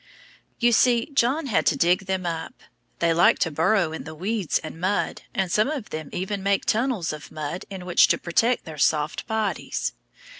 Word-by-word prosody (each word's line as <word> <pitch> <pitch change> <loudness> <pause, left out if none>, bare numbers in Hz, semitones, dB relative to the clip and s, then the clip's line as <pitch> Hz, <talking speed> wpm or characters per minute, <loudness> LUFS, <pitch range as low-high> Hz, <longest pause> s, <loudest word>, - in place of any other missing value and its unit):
You 240 0 +3
see, 240 +3 +3
John 275 +4 +2
had 235 -8 +1
to - - +3
dig 180 +3 +2
them 190 -1 -1
up; 165 -1 -5 0.3
they 170 -1 +2
like 170 +2 +5
to 165 - 0
burrow 165 +3 +2
in 160 - -6
the 160 -1 -9
weeds 195 +2 -1
and 160 +1 -8
mud, 190 +3 -1
and 190 -2 -1
some 215 +5 +3
of 280 -8 -5
them 155 -2 -5
even 190 +2 -3
make 200 0 +1
tunnels 225 - 0
of 150 - -10
mud 155 +3 -5
in 190 -2 -7
which 175 - +5
to - - +2
protect 230 +8 +1
their 155 -2 -9
soft 150 +2 +1
bodies. 220 -3 -2
185 Hz, 190 wpm, -24 LUFS, 165-220 Hz, 0.3 s, like